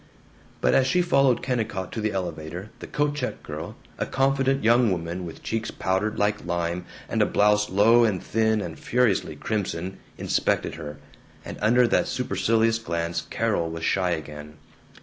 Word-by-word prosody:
But 60 Hz, -, +3 dB
as 130 Hz, -, +4 dB
she 180 Hz, +5 st, +3 dB
followed 135 Hz, -7 st, +3 dB
Kennicott 110 Hz, -7 st, -2 dB
to 110 Hz, -, -4 dB
the 110 Hz, 0 st, 0 dB
elevator 90 Hz, +1 st, -5 dB
the -, -, -8 dB
coat 145 Hz, 0 st, 0 dB
check 140 Hz, -4 st, -4 dB
girl, -, -, -6 dB, 0.2 s
a -, -, -1 dB
confident 135 Hz, 0 st, +1 dB
young 115 Hz, 0 st, +4 dB
woman, 85 Hz, 0 st, -3 dB
with 80 Hz, -, -10 dB
cheeks 115 Hz, 0 st, -2 dB
powdered 95 Hz, +3 st, -1 dB
like 105 Hz, 0 st, 0 dB
lime, 85 Hz, +1 st, -2 dB, 0.2 s
and -, -, 0 dB
a -, -, +5 dB
blouse 105 Hz, 0 st, +3 dB
low 110 Hz, +5 st, +5 dB
and 105 Hz, -5 st, +2 dB
thin 110 Hz, +1 st, +1 dB
and 80 Hz, -5 st, -6 dB
furiously 115 Hz, -10 st, +1 dB
crimson, 95 Hz, 0 st, -3 dB, 0.2 s
inspected -, -, 0 dB
her, 75 Hz, -1 st, -7 dB, 0.5 s
and -, -, -7 dB
under 120 Hz, +2 st, +4 dB
that -, -, +2 dB
supercilious 115 Hz, 0 st, +1 dB
glance 85 Hz, -5 st, -2 dB
Carol 85 Hz, -1 st, 0 dB
was 80 Hz, 0 st, -6 dB
shy 95 Hz, -2 st, +1 dB
again. 75 Hz, -2 st, -5 dB
105 Hz, 165 wpm, -25 LUFS, 85-115 Hz, 0.5 s, a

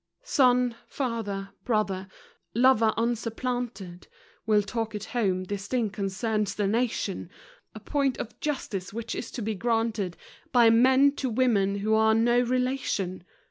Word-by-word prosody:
Son 250 Hz, -, +3 dB
Father 220 Hz, -7 st, -3 dB
Brother 200 Hz, -5 st, -1 dB, 0.5 s
Lover 235 Hz, -2 st, +5 dB
unsupplanted 230 Hz, -5 st, -3 dB, 0.4 s
We'll 210 Hz, -1 st, +4 dB
talk 225 Hz, +1 st, -3 dB
at 210 Hz, -, -4 dB
home. 190 Hz, -6 st, +1 dB
This 200 Hz, +1 st, -5 dB
thing 235 Hz, -4 st, 0 dB
concerns 200 Hz, +1 st, -2 dB
the 205 Hz, -, 0 dB
nation; 215 Hz, -4 st, -1 dB, 0.5 s
A -, -, -7 dB
point 275 Hz, -3 st, 0 dB
of 220 Hz, -, -7 dB
justice 220 Hz, -11 st, -3 dB
which 230 Hz, +2 st, -5 dB
is -, -, -5 dB
to 240 Hz, -, -5 dB
be 220 Hz, +1 st, -1 dB
granted 225 Hz, -3 st, -1 dB, 0.3 s
By 235 Hz, -3 st, +6 dB
men 260 Hz, +4 st, +5 dB
to 260 Hz, -, -1 dB
women 220 Hz, -5 st, +2 dB
who 210 Hz, +2 st, 0 dB
are 220 Hz, 0 st, +4 dB
no 240 Hz, +2 st, +3 dB
relation. 250 Hz, -7 st, -1 dB
225 Hz, 140 wpm, -27 LUFS, 200-245 Hz, 0.5 s, By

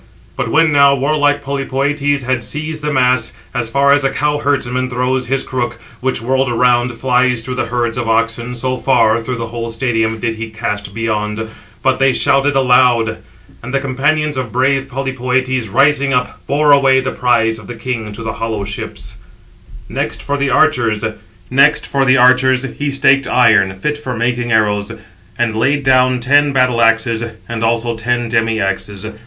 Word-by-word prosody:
But -, -, -3 dB
when 165 Hz, 0 st, +3 dB
now 140 Hz, -1 st, +5 dB
warlike 145 Hz, +1 st, +1 dB
Polypœtes 140 Hz, +1 st, -1 dB
had 130 Hz, -1 st, -1 dB
seized 155 Hz, +6 st, -4 dB
the 150 Hz, 0 st, -2 dB
mass, 125 Hz, -3 st, +1 dB, 0.2 s
as 120 Hz, -3 st, -2 dB
far 140 Hz, +3 st, +3 dB
as 145 Hz, 0 st, +2 dB
a 135 Hz, -, +2 dB
cow 150 Hz, +1 st, -1 dB
herdsman 130 Hz, -3 st, -1 dB
throws 125 Hz, +1 st, -1 dB
his 135 Hz, +1 st, -1 dB
crook, 120 Hz, -2 st, -4 dB, 0.2 s
which, 130 Hz, -3 st, -2 dB
whirled 130 Hz, +1 st, +1 dB
around, 120 Hz, 0 st, +2 dB
flies 125 Hz, -1 st, +1 dB
through 130 Hz, -, -4 dB
the 125 Hz, -, -2 dB
herds 120 Hz, 0 st, -2 dB
of 115 Hz, -1 st, -3 dB
oxen, 115 Hz, +2 st, 0 dB
so 130 Hz, +1 st, -2 dB
far, 115 Hz, -4 st, +2 dB
through 125 Hz, +2 st, -4 dB
the 115 Hz, -1 st, -4 dB
whole 115 Hz, 0 st, -5 dB
stadium, 115 Hz, -1 st, -1 dB
did 115 Hz, +1 st, -1 dB
he 110 Hz, 0 st, -6 dB
cast 105 Hz, -2 st, -5 dB
beyond; 110 Hz, -1 st, -2 dB, 0.4 s
but 130 Hz, -1 st, +1 dB
they 135 Hz, -1 st, +3 dB
shouted 140 Hz, +2 st, +2 dB
aloud; 125 Hz, -4 st, +3 dB, 0.4 s
and 130 Hz, +3 st, -5 dB
the -, -, +2 dB
companions 145 Hz, +2 st, -1 dB
of 125 Hz, -4 st, -4 dB
brave 135 Hz, +2 st, +1 dB
Polypœtes, 130 Hz, -3 st, -2 dB
rising 140 Hz, +2 st, +2 dB
up, 125 Hz, 0 st, -2 dB
bore 145 Hz, +1 st, +2 dB
away 135 Hz, -2 st, +5 dB
the 130 Hz, -, -2 dB
prize 115 Hz, -2 st, +1 dB
of 105 Hz, -, -13 dB
the 120 Hz, -, -7 dB
king 115 Hz, -2 st, -4 dB
to 110 Hz, +3 st, -8 dB
the 110 Hz, 0 st, -3 dB
hollow 110 Hz, -2 st, -3 dB
ships. 105 Hz, +1 st, -7 dB, 0.7 s
Next, -, -, -3 dB
for 145 Hz, -, -2 dB
the 140 Hz, -1 st, 0 dB
archers, 115 Hz, -10 st, +2 dB, 1.6 s
he 145 Hz, +2 st, -4 dB
staked 135 Hz, -1 st, +2 dB
iron 110 Hz, -6 st, +3 dB
fit 150 Hz, +9 st, -3 dB
for 130 Hz, -5 st, -5 dB
making 120 Hz, +1 st, -1 dB
arrows, 105 Hz, -2 st, +1 dB
772 105 Hz, +1 st, -7 dB
and 110 Hz, -2 st, -2 dB
laid 140 Hz, +6 st, +1 dB
down 130 Hz, -1 st, +3 dB
ten 145 Hz, +3 st, +3 dB
battle 125 Hz, -2 st, +2 dB
axes, 115 Hz, 0 st, +2 dB, 0.2 s
and 115 Hz, -1 st, -4 dB
also 115 Hz, +1 st, 0 dB
ten 120 Hz, +1 st, -2 dB
demi 115 Hz, -1 st, 0 dB
axes. 95 Hz, +1 st, -3 dB
125 Hz, 170 wpm, -16 LUFS, 115-135 Hz, 1.6 s, now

